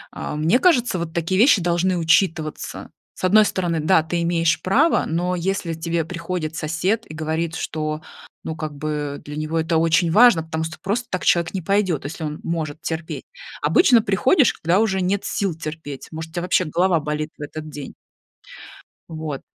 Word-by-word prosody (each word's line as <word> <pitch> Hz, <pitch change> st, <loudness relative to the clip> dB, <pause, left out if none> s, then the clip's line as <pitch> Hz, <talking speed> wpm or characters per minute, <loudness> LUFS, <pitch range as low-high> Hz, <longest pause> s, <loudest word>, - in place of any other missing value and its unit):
э, -, -, -4 dB
мне 160 Hz, +11 st, +3 dB
кажется, 245 Hz, -, +3 dB
вот 165 Hz, -1 st, -5 dB
такие 170 Hz, +3 st, 0 dB
вещи 235 Hz, -8 st, +5 dB
должны 175 Hz, +1 st, +1 dB
учитываться. 160 Hz, -2 st, 0 dB, 0.2 s
С -, -, -13 dB
одной 215 Hz, +3 st, +6 dB
стороны, 175 Hz, -5 st, -1 dB
да, 160 Hz, +1 st, +4 dB
ты 170 Hz, +2 st, -2 dB
имеешь 165 Hz, -1 st, +1 dB
право, 275 Hz, -, +3 dB
но 175 Hz, +3 st, -1 dB
если 180 Hz, -1 st, -2 dB
тебе 165 Hz, 0 st, -2 dB
приходит 170 Hz, -2 st, -4 dB
сосед 180 Hz, +9 st, -1 dB
и -, -, -11 dB
говорит, 160 Hz, +1 st, -2 dB
что, 155 Hz, 0 st, -3 dB, 0.4 s
ну, 160 Hz, -, -4 dB
как 155 Hz, -2 st, -5 dB
бы 145 Hz, -1 st, -4 dB
для 150 Hz, 0 st, -8 dB
него 155 Hz, +2 st, -2 dB
это 165 Hz, +1 st, +1 dB
очень 165 Hz, +1 st, +3 dB
важно, 220 Hz, -5 st, +6 dB
потому 160 Hz, 0 st, -3 dB
сто 160 Hz, 0 st, -5 dB
просто 235 Hz, +5 st, -2 dB
так 185 Hz, -, -2 dB
человек 170 Hz, +1 st, +2 dB
не 190 Hz, -, -2 dB
пойдет, 185 Hz, -5 st, 0 dB
если 160 Hz, +2 st, -6 dB
он 150 Hz, 0 st, -4 dB
может 155 Hz, -3 st, -3 dB
терпеть. 160 Hz, 0 st, -5 dB, 0.4 s
Обычно 250 Hz, -10 st, +5 dB
приходишь, 240 Hz, -, +3 dB
когда 175 Hz, +5 st, +1 dB
уже 195 Hz, -4 st, +1 dB
нет 190 Hz, +2 st, 0 dB
сил 195 Hz, -4 st, -1 dB
терпеть, 155 Hz, -3 st, -7 dB
может, 160 Hz, 0 st, -6 dB
у -, -, -26 dB
тебя 175 Hz, -, -2 dB
вообще 185 Hz, 0 st, +2 dB
голова 175 Hz, +2 st, +2 dB
болит 150 Hz, +1 st, -3 dB
в -, -, -13 dB
этот 155 Hz, +1 st, -7 dB
день. 145 Hz, -2 st, -8 dB, 1.2 s
Вот. 155 Hz, -4 st, -5 dB
165 Hz, 180 wpm, -22 LUFS, 155-185 Hz, 1.2 s, одной